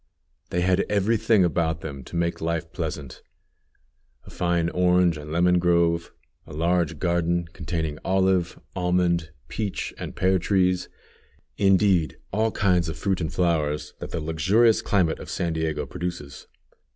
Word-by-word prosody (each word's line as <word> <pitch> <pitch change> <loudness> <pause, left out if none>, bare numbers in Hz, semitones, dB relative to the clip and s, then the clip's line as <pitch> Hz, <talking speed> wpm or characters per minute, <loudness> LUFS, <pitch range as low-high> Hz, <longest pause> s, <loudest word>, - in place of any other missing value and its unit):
They 90 - -1
had 90 0 +2
every 105 +3 +2
thing 110 -3 +3
about 80 -1 0
them 70 -4 -7
to - - -10
make 85 0 -1
life 80 0 -2
pleasant: 75 -6 -5 1.0
a - - -14
fine 85 -1 0
orange 90 -1 +3
and 75 0 -8
lemon 90 +2 +3
grove; 85 -1 +2 0.4
a - - -10
large 85 0 0
garden, 85 +1 0
containing 80 -2 -3
olive, 95 -2 +1 0.2
almond, 90 -2 +1 0.2
peach, 105 -3 -4
and - - -6
pear 95 0 +2
trees; 90 -1 +1 0.7
indeed, 95 -4 +3 0.2
all 110 +2 +2
kinds 90 -6 +1
of 80 - -5
fruit 95 -3 -1
and 80 - -2
flowers, 75 -4 0
that - - -6
the - - -3
luxurious 95 +9 +3
climate 90 -6 +1
of - - -9
San 85 -2 -2
Diego 80 -2 -2
produces. 75 -3 -6
85 Hz, 145 wpm, -25 LUFS, 80-90 Hz, 1.0 s, thing